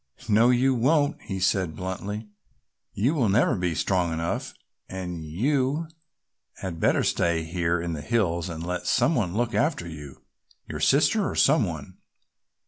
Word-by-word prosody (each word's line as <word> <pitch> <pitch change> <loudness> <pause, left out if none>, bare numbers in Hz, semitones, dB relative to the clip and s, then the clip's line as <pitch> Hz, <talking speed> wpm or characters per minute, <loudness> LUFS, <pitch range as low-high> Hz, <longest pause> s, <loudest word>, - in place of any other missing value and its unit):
"No 115 +3 +5
you 130 +2 +3
won't,"' 145 +4 +2
he 95 -1 -5
said 95 -3 +1
bluntly, 100 +4 -5 0.6
"you 120 +10 +1
will 125 -10 +1
never 105 +5 +3
be 90 -3 -1
strong 90 0 +1
enough 80 +1 -3 0.3
and 90 -3 -5
you 135 - 0 0.7
had 85 -4 -6
better - - +2
stay 85 -1 +1
here 85 +1 -1
in 85 0 -3
the 75 - -5
hills 90 -4 0
and 85 0 -6
let 90 0 -3
some 165 - +3
one 100 - -1
look 120 +1 0
after 145 - 0
you, 75 -4 -10 0.4
your - - -5
sister - - +3
or - - -5
some - - +4
one. - - -7
95 Hz, 155 wpm, -26 LUFS, 85-120 Hz, 0.7 s, No